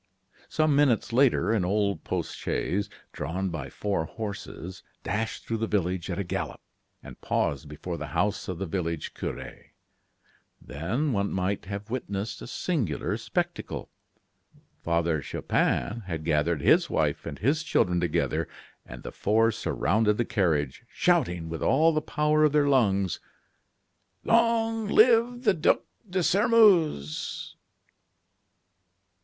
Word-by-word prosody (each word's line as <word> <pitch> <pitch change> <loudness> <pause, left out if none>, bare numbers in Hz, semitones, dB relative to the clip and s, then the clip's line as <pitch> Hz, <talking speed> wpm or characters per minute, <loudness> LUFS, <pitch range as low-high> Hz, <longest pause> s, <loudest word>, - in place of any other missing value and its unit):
Some 155 -2 +2
minutes 130 -5 +2
later 130 -2 +3
an 110 -5 +2
old 100 -1 0
post - - -3
chaise, 100 +4 -2 0.2
drawn 95 +6 -3
by 85 -5 -5
four 100 -6 -2
horses, 95 -2 -7 0.2
dashed 110 +1 -3
through 115 -1 -2
the 115 - -1
village 95 -3 -1
at 90 - -2
a 100 - -1
gallop, 90 - -4 0.4
and - - -12
paused 70 +1 -1
before 85 +4 -5
the - - -5
house 100 +5 -1
of 90 -3 -4
the 95 - -3
village 85 -3 -3
cure. - - -5 1.1
Then 115 - -2
one 100 -1 0
might 95 +2 -1
have 100 +3 -6
witnessed 105 -4 -4
a - - -7
singular 120 - -1
spectacle. - - -3 0.9
Father 85 -2 0
Chupin 115 - -1
had 80 -3 -4
gathered 75 0 +1
his - - +4
wife - - 0
and - - -5
his 145 +8 +1
children 90 - +1
together, 85 -1 0 0.4
and - - -11
the - - -6
four 115 +2 +2
surrounded 105 +1 +1
the 120 - +1
carriage, 80 - 0
shouting, 85 -2 +1
with 80 0 -5
all 160 +4 +4
the 155 - +1
power 150 +1 +1
of 150 - +2
their 150 -1 +4
lungs: 100 -9 +2 1.0
"Long 225 -1 +2
live 235 +3 +4
the 220 - +4
Duc 160 -3 +2 0.3
de 185 0 0
Sairmeuse!" 190 - +3
105 Hz, 135 wpm, -27 LUFS, -, 1.1 s, his